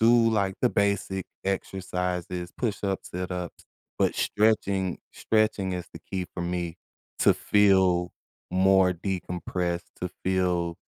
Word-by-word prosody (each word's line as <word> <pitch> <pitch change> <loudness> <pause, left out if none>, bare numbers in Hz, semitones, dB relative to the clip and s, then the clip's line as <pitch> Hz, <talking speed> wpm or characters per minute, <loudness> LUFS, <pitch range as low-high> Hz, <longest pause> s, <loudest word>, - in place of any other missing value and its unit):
do, 115 0 +6
like, 100 -3 +1
the - - +4
basic 100 -2 0 0.2
exercises- 90 -2 -2
push-ups, 100 -4 -2
sit-ups, 90 -1 -4 0.3
but - - +2
stretching 100 -4 +1
stretching 110 -3 +1
is 90 -1 -4
the - - -8
key 95 -2 -4
for 85 - -3
me 85 -1 -2 0.4
to - - +6
feel 95 -4 +3 0.4
more 95 0 +5
decompressed, 90 -1 -3 0.2
to 90 - -1 0.2
feel, 90 -2 +1
95 Hz, 115 wpm, -27 LUFS, 90-100 Hz, 0.4 s, do